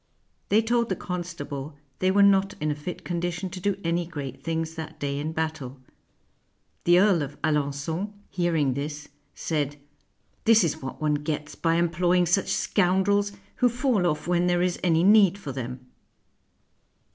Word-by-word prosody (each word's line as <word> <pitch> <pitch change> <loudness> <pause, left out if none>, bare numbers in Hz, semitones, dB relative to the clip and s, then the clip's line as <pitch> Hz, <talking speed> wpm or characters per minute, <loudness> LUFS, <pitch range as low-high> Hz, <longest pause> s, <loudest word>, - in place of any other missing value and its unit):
They 215 +2 +4
told 235 +1 +1
the 190 - 0
constable 160 -6 -5 0.2
they 185 - +2
were 200 +1 +5
not 195 0 +4
in 155 0 0
a - - -2
fit 150 +5 -7
condition 175 +1 -3
to 185 - -6
do 200 +1 -1
any 170 +1 0
great 140 -6 -6
things 165 -1 -2
that 160 -1 -8
day 140 -1 -2
in 155 +2 -3
battle. 155 -5 -4 1.1
The 175 +1 +6
Earl 190 -4 +4
of 145 0 -6
Alengon, 150 +5 -1 0.2
hearing 165 -7 +1
this, 150 +2 -5 0.3
said, 145 -3 -2 0.7
"This 225 -2 +6
is 160 -1 -1
what 130 - -6
one 150 -1 +1
gets 150 0 -3
by 165 -1 0
employing 175 +1 +2
such 180 +3 +1
scoundrels, 200 +2 +2 0.2
who 250 - +4
fall 240 -6 +1
off 155 -1 -2
when 175 0 +2
there 175 0 +2
is 180 -1 0
any 165 -2 +3
need 200 -1 +6
for 150 -9 -6
them." 125 0 -6
170 Hz, 160 wpm, -26 LUFS, 150-185 Hz, 1.1 s, The